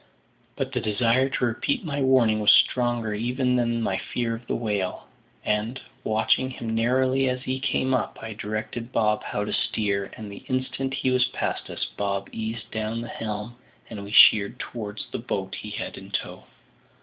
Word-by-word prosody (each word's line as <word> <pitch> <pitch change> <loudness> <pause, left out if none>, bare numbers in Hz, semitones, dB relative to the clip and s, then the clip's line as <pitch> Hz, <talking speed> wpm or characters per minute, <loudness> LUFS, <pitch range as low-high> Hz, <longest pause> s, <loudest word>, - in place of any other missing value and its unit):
But - - -2
the - - 0
desire 115 +5 +2
to 130 -1 0
repeat 200 - -1
my 145 -2 -2
warning 125 -5 +4
was 105 - +6
stronger 120 -3 +3
even 125 +4 +1
than 120 -1 +1
my 95 -3 0
fear 120 -2 -2
of 115 +1 -8
the - - 0
whale; 105 -5 -2 0.4
and, 110 +5 0 0.2
watching 110 +4 +2
him 115 -3 -4
narrowly 130 +3 +2
as 125 0 -2
he 130 0 -2
came 130 -1 +1
up, 130 - 0
I 110 -1 -6
directed 110 +3 -4
Bob 105 -3 +2
how 105 - -2
to - - -3
steer, 100 -2 0
and 105 -2 -7
the 100 - -10
instant 130 +1 -1
he 130 - +1
was 125 0 +4
past - - -3
us, - - -3
Bob 100 -1 -1
eased 110 0 -5
down 110 +1 -2
the 120 - -6
helm, 110 +2 -5 0.3
and 105 -3 -6
we 100 - -8
sheered 105 -1 +7
towards 110 -3 -6
the - - -3
boat 95 -5 -3
he 105 - -6
had 105 - -5
in - - -12
tow. - - -4
115 Hz, 185 wpm, -26 LUFS, 105-125 Hz, 0.4 s, sheered